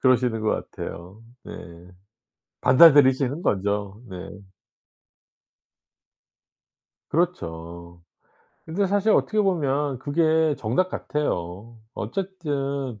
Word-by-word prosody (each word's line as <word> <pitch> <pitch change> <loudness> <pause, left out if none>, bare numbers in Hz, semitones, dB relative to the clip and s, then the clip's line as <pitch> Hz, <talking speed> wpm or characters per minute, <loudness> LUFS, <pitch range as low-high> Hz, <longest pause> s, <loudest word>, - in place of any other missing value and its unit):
그러시는 125 -3 +2
것 110 - -1
같아요. 90 +6 -8 0.2
네. - - -9 1.1
받아들이시는 140 0 +5
거죠. 100 +1 -1
네. 95 - -7 2.9
그렇죠. 85 - -3 0.6
근데 185 +5 0
사실 205 +3 +1
어떻게 215 0 +2
보면 145 -8 0
그게 160 +2 +2
정답 125 +12 0
같아요. 110 - -4 0.2
어쨌든 140 - -4
135 Hz, 185 characters per minute, -24 LUFS, 105-160 Hz, 2.9 s, 받아들이시는